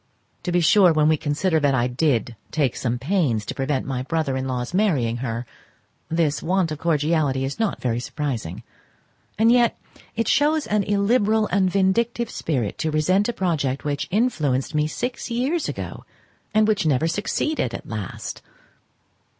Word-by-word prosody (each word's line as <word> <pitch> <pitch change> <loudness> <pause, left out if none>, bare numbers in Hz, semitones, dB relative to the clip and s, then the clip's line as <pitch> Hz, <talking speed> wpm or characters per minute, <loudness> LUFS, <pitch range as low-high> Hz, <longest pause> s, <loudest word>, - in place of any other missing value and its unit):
To 180 - -3
be 175 0 +2
sure, 180 +2 +6
when 155 -1 +3
we 155 - +4
consider 155 +3 0
that 145 -2 +2
I 120 -2 +2
did 125 -2 0 0.2
take 145 -6 +1
some 125 -1 -1
pains 135 - 0
to - - -4
prevent 135 0 -1
my 130 -2 -2
brother 155 0 -1
in 130 0 -2
law's 125 +2 -3
marrying 145 - +1
her, 120 -1 -3 0.6
this 160 -3 +1
want 180 -1 +1
of 155 - -4
cordiality 150 -4 +1
is 140 +8 -5
not 225 -2 0
very 120 -2 -1
surprizing, 120 - -4 0.7
and 225 +2 +5
yet 240 -1 +3 0.4
it 230 0 -1
shows 300 +2 +3
an 210 0 +1
illiberal 215 +1 +2
and 190 -1 +3
vindictive 230 +5 +1
spirit 125 -10 -2
to 160 - 0
resent 185 +8 +2
a - - -1
project 145 - -1
which 145 -1 -2
influenced 165 - 0
me 150 0 +1
six 245 +11 -4
years 265 +8 0
ago, - - -6 0.5
and 215 0 +3
which 215 -2 +2
never 150 +2 +2
succeeded 205 - -1
at - - -8
last. 105 -4 -6
155 Hz, 165 wpm, -23 LUFS, 135-205 Hz, 0.7 s, sure